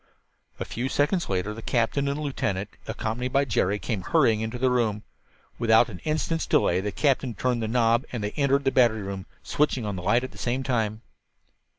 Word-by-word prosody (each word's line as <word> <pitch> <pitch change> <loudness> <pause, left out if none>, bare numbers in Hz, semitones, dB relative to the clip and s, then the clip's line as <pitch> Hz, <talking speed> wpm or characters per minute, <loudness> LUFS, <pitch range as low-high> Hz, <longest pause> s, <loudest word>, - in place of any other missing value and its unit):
A - - -3
few 125 +3 -3
seconds 170 +7 +1
later 95 +2 -1
the 115 - -8
captain 125 +5 0
and 140 +1 -1
lieutenant, 105 -9 -2 0.2
accompanied 115 +3 -3
by 140 +1 +3
Jerry, 105 -4 +1
came 105 -2 -3
hurrying 110 +4 +2
into 110 +2 -3
the 130 +1 +2
room. 110 -4 0 0.6
Without 115 0 +4
an 90 -5 -8
instant's 155 +1 -1
delay 90 +2 +3
the 105 +1 -3
captain 135 -2 +1
turned 125 +2 0
the 110 - -1
knob 115 +1 +2
and 120 -4 -4
they 105 - -2
entered 140 +1 +1
the 135 - +2
battery 115 -5 +3
room, 95 -1 -6 0.2
switching 140 -5 0
on 105 -2 -3
the - - -5
light 115 +7 +2
at 130 - -5
the - - -14
same 125 +2 -1
time. 110 -4 -1
115 Hz, 200 wpm, -26 LUFS, 105-130 Hz, 0.6 s, Without